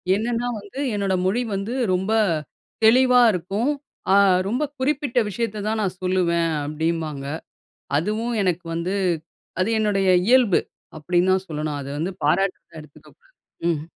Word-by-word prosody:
என்னன்னா 235 Hz, +3 st, -1 dB
வந்து, 205 Hz, +6 st, -10 dB
என்னோட 200 Hz, -2 st, 0 dB
மொழி 210 Hz, +7 st, +1 dB
வந்து 195 Hz, +5 st, -3 dB, 0.2 s
ரொம்ப 190 Hz, +4 st, 0 dB, 0.7 s
தெளிவா 250 Hz, +2 st, +6 dB
இருக்கும். 200 Hz, -, -1 dB, 0.4 s
அ -, -, +6 dB, 0.3 s
ரொம்ப 245 Hz, +8 st, 0 dB, 0.2 s
குறிப்பிட்ட 270 Hz, -2 st, 0 dB
விஷயத்த 215 Hz, +1 st, -3 dB
தான் 220 Hz, +1 st, 0 dB
நான் 190 Hz, -3 st, -2 dB
சொல்லுவேன் 175 Hz, -2 st, +1 dB
அப்பிடிம்பாங்க. 155 Hz, -1 st, -2 dB, 0.7 s
அதுவும் 215 Hz, +8 st, -1 dB
எனக்கு 180 Hz, -2 st, -1 dB
வந்து 170 Hz, +3 st, -2 dB, 0.7 s
அது 185 Hz, +4 st, +1 dB
என்னுடைய 200 Hz, -3 st, +1 dB, 0.2 s
இயல்பு, 245 Hz, -6 st, +5 dB, 0.4 s
அப்பிடின்னு 175 Hz, +4 st, +1 dB
தான் 190 Hz, 0 st, -1 dB
சொல்லணும். 150 Hz, -2 st, -3 dB
அத 140 Hz, -, -7 dB
வந்து 175 Hz, +5 st, -2 dB
பாராட்டுறதா 175 Hz, +1 st, 0 dB
எடுத்துக்கக்கூடாது 155 Hz, -, -19 dB, 0.4 s
ம். 160 Hz, -3 st, 0 dB
190 Hz, 130 wpm, -23 LUFS, 170-225 Hz, 0.7 s, தெளிவா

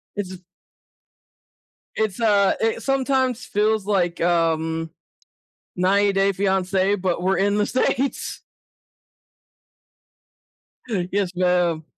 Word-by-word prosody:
It's 190 Hz, -3 st, -5 dB, 1.6 s
It's, 215 Hz, -2 st, -1 dB
uh, 205 Hz, -3 st, +3 dB
it 225 Hz, 0 st, -1 dB
sometimes 260 Hz, -2 st, 0 dB
feels 210 Hz, 0 st, 0 dB
like, 175 Hz, -5 st, 0 dB
um, 165 Hz, -1 st, 0 dB, 0.9 s
90 200 Hz, +3 st, +2 dB
Day 195 Hz, 0 st, +2 dB
Fiancé, 190 Hz, 0 st, 0 dB
but 180 Hz, -2 st, -1 dB
we're 190 Hz, +1 st, +1 dB
in 200 Hz, +1 st, +1 dB
The 210 Hz, -, +2 dB
States. 260 Hz, +2 st, -1 dB, 2.7 s
Yes, 195 Hz, -2 st, -1 dB
ma'am. 175 Hz, -3 st, +1 dB
195 Hz, 90 wpm, -22 LUFS, 180-210 Hz, 2.7 s, uh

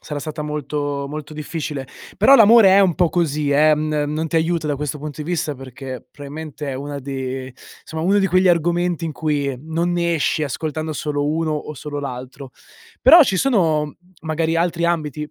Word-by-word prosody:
sarà 150 Hz, -, -5 dB
stata 155 Hz, 0 st, -5 dB
molto 145 Hz, -1 st, -3 dB
molto 150 Hz, +1 st, -7 dB
difficile. 150 Hz, -2 st, -5 dB, 0.3 s
Però 275 Hz, -, +7 dB
l'amore 225 Hz, -2 st, +7 dB
è 195 Hz, -, +6 dB
un 185 Hz, -4 st, +3 dB
po' 175 Hz, +1 st, +2 dB
così 150 Hz, -4 st, 0 dB
eh, 150 Hz, +2 st, +5 dB
mhmm, 150 Hz, -1 st, -1 dB
non 160 Hz, +1 st, -2 dB
ti 165 Hz, -, -1 dB
aiuta 165 Hz, 0 st, 0 dB
da 145 Hz, -1 st, -1 dB
questo 150 Hz, +1 st, -4 dB
punto 150 Hz, +1 st, -6 dB
di 150 Hz, -, -9 dB
vista 160 Hz, -4 st, -1 dB
perché 130 Hz, -1 st, -9 dB
probabilmente 150 Hz, +1 st, -8 dB
è 135 Hz, -, -3 dB
una 140 Hz, +2 st, -5 dB
di 130 Hz, -1 st, -5 dB, 0.3 s
somma, 160 Hz, 0 st, -5 dB
uno 195 Hz, +4 st, +3 dB
di 195 Hz, -, +2 dB
quegli 185 Hz, 0 st, +3 dB
argomenti 175 Hz, 0 st, +1 dB
in 155 Hz, -, -4 dB
cui 145 Hz, -3 st, -1 dB
non 165 Hz, +5 st, -2 dB
ne 170 Hz, -1 st, 0 dB
esci 155 Hz, 0 st, 0 dB
ascoltando 155 Hz, +3 st, -3 dB
solo 145 Hz, -1 st, -2 dB
uno 155 Hz, +1 st, 0 dB
o 150 Hz, 0 st, -4 dB
solo 145 Hz, +2 st, -6 dB
l'altro. 130 Hz, 0 st, -7 dB, 0.5 s
Però 335 Hz, -, +9 dB
ci 195 Hz, -9 st, +1 dB
sono 160 Hz, -, +1 dB, 0.3 s
magari 160 Hz, +1 st, -1 dB
altri 170 Hz, 0 st, 0 dB
ambiti: 150 Hz, -3 st, -2 dB
155 Hz, 190 wpm, -20 LUFS, 145-170 Hz, 0.5 s, Però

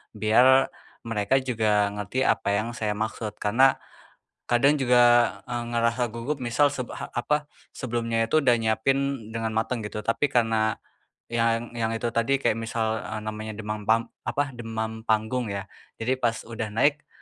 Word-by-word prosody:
biar 125 Hz, +5 st, +5 dB, 0.3 s
mereka 115 Hz, +1 st, 0 dB
juga 105 Hz, -5 st, +1 dB
ngerti 105 Hz, +6 st, -2 dB
apa -, -, +1 dB
yang 110 Hz, +3 st, -1 dB
saya 110 Hz, -3 st, -2 dB
maksud, 110 Hz, 0 st, -4 dB
karena 125 Hz, +7 st, +3 dB, 0.7 s
kadang 140 Hz, +4 st, +3 dB
juga, 125 Hz, -1 st, +4 dB, 0.4 s
eee, 120 Hz, -1 st, -3 dB
ngerasa 120 Hz, +1 st, +1 dB
gugup 115 Hz, +6 st, -4 dB
misal 130 Hz, +4 st, +2 dB
seb 125 Hz, -4 st, -4 dB
ha -, -, -7 dB
apa, 150 Hz, +5 st, 0 dB, 0.3 s
sebelumnya 115 Hz, -2 st, -1 dB
itu 155 Hz, +8 st, +2 dB
udah 125 Hz, -5 st, +4 dB
nyiapin 125 Hz, +2 st, 0 dB
dengan 115 Hz, 0 st, -3 dB
mateng 110 Hz, +1 st, -1 dB
gitu. 105 Hz, 0 st, -5 dB
Tapi 115 Hz, +7 st, -1 dB
karena 110 Hz, -2 st, +2 dB, 0.6 s
yang 115 Hz, 0 st, 0 dB
yang 115 Hz, 0 st, 0 dB
itu 115 Hz, +1 st, -2 dB
tadi, 115 Hz, +4 st, +1 dB
kayak 110 Hz, -, +2 dB
misal, 110 Hz, -1 st, -1 dB
eee, 110 Hz, -1 st, -5 dB
namanya 110 Hz, 0 st, -5 dB
demam 105 Hz, -1 st, -5 dB
pam 115 Hz, +1 st, +2 dB, 0.2 s
apa, 145 Hz, 0 st, -1 dB
demam 110 Hz, -2 st, -5 dB
panggung 110 Hz, +3 st, +1 dB
ya. 100 Hz, -1 st, -3 dB, 0.3 s
Jadi 130 Hz, +3 st, -1 dB
pas 115 Hz, -3 st, 0 dB
udah 115 Hz, -1 st, -5 dB
naik, 145 Hz, +5 st, +2 dB
115 Hz, 155 wpm, -26 LUFS, 110-125 Hz, 0.7 s, biar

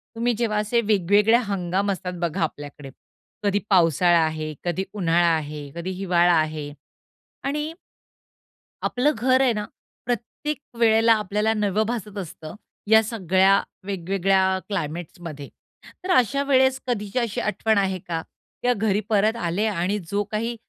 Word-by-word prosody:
तुम्ही 235 Hz, +1 st, +1 dB
जेव्हा 225 Hz, -3 st, 0 dB
असे 215 Hz, +3 st, +1 dB
वेगवेगळे 210 Hz, +2 st, +3 dB
हंगाम 195 Hz, 0 st, -1 dB
असतात 180 Hz, -1 st, -4 dB
बघा 170 Hz, +2 st, -1 dB
आपल्याकडे. 145 Hz, -2 st, -6 dB, 0.5 s
कधी 205 Hz, 0 st, +2 dB
पावसाळा 175 Hz, -2 st, +4 dB
आहे, 155 Hz, -1 st, -3 dB
कधी 175 Hz, +2 st, -1 dB
उन्हाळा 175 Hz, -3 st, +2 dB
आहे, 150 Hz, -2 st, -5 dB
कधी 170 Hz, +2 st, -4 dB
हिवाळा 180 Hz, -2 st, +2 dB
आहे. 155 Hz, -2 st, -3 dB, 0.7 s
आणि 300 Hz, +3 st, -2 dB, 1.1 s
आपलं 270 Hz, +5 st, +2 dB
घर 255 Hz, +3 st, +3 dB
आहे 255 Hz, -3 st, +3 dB
ना. 210 Hz, -1 st, -3 dB, 0.4 s
प्रत्येक 245 Hz, +5 st, -3 dB, 0.2 s
वेळेला 225 Hz, 0 st, +5 dB
आपल्याला 210 Hz, +2 st, 0 dB
नवं 210 Hz, 0 st, 0 dB
भासत 215 Hz, -3 st, -4 dB
असतं, 160 Hz, -4 st, -7 dB, 0.3 s
या 220 Hz, +1 st, +7 dB
सगळ्या 195 Hz, -3 st, +3 dB, 0.2 s
वेगवेगळ्या 190 Hz, 0 st, +1 dB
क्लायमेट्समध्ये. 165 Hz, -4 st, -5 dB, 0.5 s
तर 370 Hz, -, -1 dB
अशा 275 Hz, +3 st, +2 dB
वेळेस 265 Hz, -1 st, +3 dB
कधीच्या 210 Hz, 0 st, -1 dB
अशी 230 Hz, -4 st, -2 dB
आठवण 220 Hz, +1 st, 0 dB
आहे 190 Hz, -2 st, +1 dB
का, 165 Hz, -2 st, -2 dB, 0.4 s
या 245 Hz, 0 st, +3 dB
घरी 210 Hz, -1 st, 0 dB
परत 215 Hz, +1 st, +3 dB
आले. 180 Hz, 0 st, -1 dB
आणि 200 Hz, +1 st, -1 dB
जो 205 Hz, +1 st, +1 dB
काही 230 Hz, +2 st, -2 dB
200 Hz, 135 wpm, -23 LUFS, 175-225 Hz, 1.1 s, या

